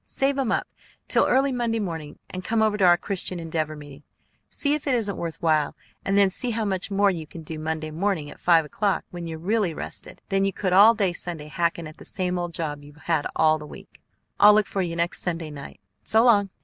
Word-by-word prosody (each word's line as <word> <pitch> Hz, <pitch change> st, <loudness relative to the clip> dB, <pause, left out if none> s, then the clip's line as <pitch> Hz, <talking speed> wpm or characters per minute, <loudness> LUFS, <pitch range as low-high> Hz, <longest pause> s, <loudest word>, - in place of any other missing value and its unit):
"Save 275 Hz, +1 st, 0 dB
'em 255 Hz, -4 st, 0 dB
up -, -, 0 dB, 0.4 s
till -, -, +3 dB
early 270 Hz, +1 st, +3 dB
Monday 240 Hz, -2 st, -1 dB
morning, 165 Hz, -8 st, -5 dB
and 185 Hz, 0 st, -7 dB
come 220 Hz, +3 st, +1 dB
over 215 Hz, -1 st, +2 dB
to 200 Hz, -3 st, +3 dB
our 175 Hz, -1 st, +6 dB
Christian 185 Hz, -1 st, -4 dB
Endeavor 160 Hz, -2 st, -3 dB
meeting. 145 Hz, -1 st, -12 dB, 0.5 s
See 285 Hz, -1 st, 0 dB
if 300 Hz, 0 st, -3 dB
it 265 Hz, -, +3 dB
isn't 205 Hz, -5 st, -1 dB
worth 165 Hz, -2 st, -5 dB
while, 155 Hz, -3 st, +2 dB, 0.3 s
and 195 Hz, +1 st, +1 dB
then 200 Hz, -1 st, +5 dB
see 250 Hz, +6 st, -2 dB
how 225 Hz, -1 st, -1 dB
much 190 Hz, -1 st, -2 dB
more 200 Hz, 0 st, +3 dB
you 160 Hz, -4 st, -6 dB
can 165 Hz, +1 st, -10 dB
do 155 Hz, 0 st, -7 dB
Monday 155 Hz, 0 st, -3 dB
morning 170 Hz, -2 st, -1 dB
at -, -, -14 dB
five 165 Hz, -3 st, +4 dB
o'clock, 200 Hz, +6 st, -1 dB
when 175 Hz, -1 st, -6 dB
you're 160 Hz, -1 st, -5 dB
really 190 Hz, 0 st, 0 dB
rested, -, -, -4 dB
than 195 Hz, 0 st, +2 dB
you 195 Hz, 0 st, 0 dB
could 185 Hz, -1 st, -1 dB
all 210 Hz, +5 st, +8 dB
day 195 Hz, -5 st, +1 dB
Sunday 165 Hz, -3 st, -6 dB
hacking 170 Hz, +1 st, -1 dB
at 155 Hz, 0 st, -10 dB
the -, -, -13 dB
same 180 Hz, -1 st, -2 dB
old 175 Hz, -1 st, -4 dB
job 145 Hz, -3 st, -4 dB
you've 145 Hz, 0 st, -14 dB
had 160 Hz, -2 st, -1 dB
all 155 Hz, 0 st, +3 dB
the 150 Hz, -, -9 dB
week. -, -, -14 dB, 0.4 s
I'll 210 Hz, 0 st, +8 dB
look 215 Hz, -1 st, +3 dB
for 195 Hz, -, -2 dB
you 170 Hz, -2 st, -2 dB
next 170 Hz, 0 st, -1 dB
Sunday 165 Hz, -3 st, -3 dB
night. 140 Hz, -8 st, -10 dB, 0.2 s
So 220 Hz, -, +4 dB
long!" 205 Hz, -5 st, +4 dB
180 Hz, 235 wpm, -25 LUFS, 160-205 Hz, 0.5 s, all